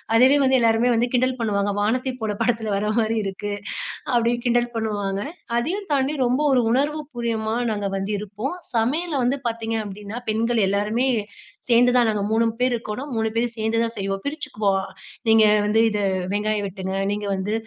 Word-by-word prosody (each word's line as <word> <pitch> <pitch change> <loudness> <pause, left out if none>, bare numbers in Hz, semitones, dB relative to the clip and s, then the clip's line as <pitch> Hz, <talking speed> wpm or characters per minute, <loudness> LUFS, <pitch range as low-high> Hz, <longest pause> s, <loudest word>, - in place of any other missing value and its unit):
அதுவே 260 +5 +6
வந்து, 265 0 +4
எல்லாருமே 230 +1 +3
வந்து 240 +2 +2
கிண்டல் 255 +1 +2
பண்ணுவாங்க. 205 -2 0
"வானத்தை 255 +5 0
போல 215 -1 -1
படத்தில 225 -3 0
வர 210 +1 -1
மாரி 225 0 +1
இருக்கு" 195 +1 -4 0.6
அப்படின்னு 240 0 +2
கிண்டல் 240 0 +2
பண்ணுவாங்க. 205 -3 -2 0.4
அதையும் 370 +11 -1
தாண்டி 275 +1 +1
ரொம்ப 250 +4 +1
ஒரு 250 - +4
உணர்வு 295 +4 +1
பூர்வமா 225 -2 -2 0.2
நாங்க 205 -2 -2
வந்து 195 +2 -3
இருப்போம், 210 - -4 0.2
சமையல்ல 295 +9 0
வந்து 265 +3 +1
பாத்தீங்க 225 0 -3
அப்படின்னா 205 +2 -7
பெண்கள் 230 +2 +1
எல்லாருமே 210 +6 +1 0.6
சேர்ந்து 245 +1 +5
தான் 245 - +6
நாங்க 210 -2 0
3 230 +1 +3 0.2
பேர் 250 -1 +3
இருக்கோன்னா, 230 +2 -5
3 220 0 +1
பேரும் 235 0 0
சேந்து 220 +1 0
தான் 230 - -2
செய்வோம். 195 0 -2
பிரிச்சுக்குவோம் 210 -10 -1 0.5
"நீங்க 220 0 +6 0.2
வந்து 215 +2 +3
இத 210 -1 -2 0.3
வெங்காயம் 210 0 0
வெட்டுங்க, 190 0 -5 0.2
நீங்க 205 0 -3
வந்து 190 +3 -2
225 Hz, 165 wpm, -23 LUFS, 210-245 Hz, 0.6 s, அதுவே